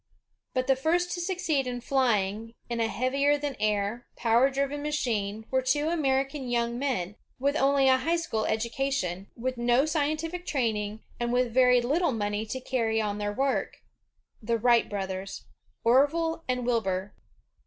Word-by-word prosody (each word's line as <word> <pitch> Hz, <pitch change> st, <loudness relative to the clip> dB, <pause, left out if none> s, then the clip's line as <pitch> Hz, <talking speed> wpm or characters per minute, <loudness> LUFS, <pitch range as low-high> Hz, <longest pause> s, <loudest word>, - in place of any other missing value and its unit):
But 255 Hz, 0 st, +1 dB
the 270 Hz, 0 st, +3 dB
first 345 Hz, +6 st, +1 dB
to 350 Hz, -, -3 dB
succeed 340 Hz, -7 st, 0 dB
in 245 Hz, -1 st, -3 dB
flying 225 Hz, -4 st, 0 dB, 0.2 s
in 235 Hz, -, -1 dB
a 225 Hz, -, +2 dB
heavier 275 Hz, +6 st, +1 dB
than 290 Hz, -2 st, -3 dB
air, 210 Hz, +2 st, -1 dB
power 235 Hz, +3 st, +3 dB
driven 280 Hz, +1 st, -2 dB
machine 220 Hz, -8 st, -2 dB
were 260 Hz, 0 st, +2 dB
two 290 Hz, +5 st, +1 dB
Amer 270 Hz, -5 st, +2 dB
ican 270 Hz, -2 st, -7 dB
young 235 Hz, 0 st, 0 dB
men, 220 Hz, -8 st, -2 dB, 0.2 s
with 280 Hz, +3 st, 0 dB
only 275 Hz, -2 st, +3 dB
a 260 Hz, 0 st, +6 dB
high 325 Hz, +6 st, 0 dB
school 280 Hz, -11 st, -2 dB
education, 225 Hz, -5 st, -1 dB
with 255 Hz, +2 st, -3 dB
no 240 Hz, +3 st, +3 dB
scientific 310 Hz, +3 st, -2 dB
training, 220 Hz, -5 st, -1 dB, 0.2 s
and 240 Hz, 0 st, -1 dB
with 245 Hz, -1 st, +1 dB
very 250 Hz, -1 st, +5 dB
little 295 Hz, +5 st, +1 dB
money 210 Hz, 0 st, -2 dB
to 260 Hz, +5 st, -4 dB
carry 230 Hz, -4 st, 0 dB
on 210 Hz, -1 st, -2 dB
their 205 Hz, 0 st, -1 dB
work, 270 Hz, +6 st, -1 dB, 0.3 s
— -, -, -44 dB
the 230 Hz, +1 st, 0 dB
Wright 235 Hz, +1 st, +3 dB
brothers, 195 Hz, -1 st, -5 dB, 0.4 s
Orville 325 Hz, +7 st, +2 dB
and 250 Hz, -1 st, -1 dB
Wilbur. 200 Hz, -5 st, -1 dB
250 Hz, 165 wpm, -28 LUFS, 220-280 Hz, 0.4 s, a